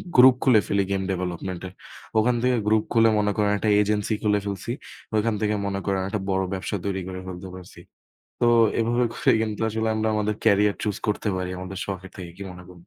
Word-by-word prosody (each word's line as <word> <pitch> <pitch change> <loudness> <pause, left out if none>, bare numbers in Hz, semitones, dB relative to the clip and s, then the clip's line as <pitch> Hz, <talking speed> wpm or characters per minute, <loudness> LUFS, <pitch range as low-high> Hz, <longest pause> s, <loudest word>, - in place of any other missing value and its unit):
Group 130 0 +8
খুলে 125 -5 +6
ফেলি 100 0 +2
game 95 -1 0
development 90 0 -4
এর। 90 - -11 0.5
ওখান 120 +3 +2
থেকে 125 0 +2
গ্রুপ 110 0 +3
খুলে 115 -1 +5
মনে 105 0 +1
করেন 105 -1 +2
একটা 110 - 0
এজেন্সি 105 +1 0
খুলে 105 -1 +3
ফেলছি। 100 +3 -4 0.4
ওইখান 110 +1 +2
থেকে 105 0 +1
মনে 100 -1 -2
করেন 95 -1 0
একটা 105 +1 -2
বড় 95 0 +1
ব্যবসা 95 +2 -3
তৈরি 95 -1 -1
করে 95 0 -6
ফেলতে 95 0 -7
পারছি। 90 -1 -12 0.6
তো 120 - +3 0.3
এভাবে 120 +2 +2
করে - - +2
কিন্তু 110 -2 -2
আসলে 110 +1 -1
আমরা 110 0 0
আমাদের 105 0 0
ক্যারিয়ার 105 -1 +4
চুজ 105 -3 -1
করতে 105 0 -1
পারি 90 0 -3
আমাদের 95 +1 -6
শখের 95 -1 -6
থেকে, 90 -2 -7
কি 100 - -8
মনে 90 0 -10
কর - - -11
105 Hz, 205 wpm, -24 LUFS, 95-110 Hz, 0.6 s, গ্রুপ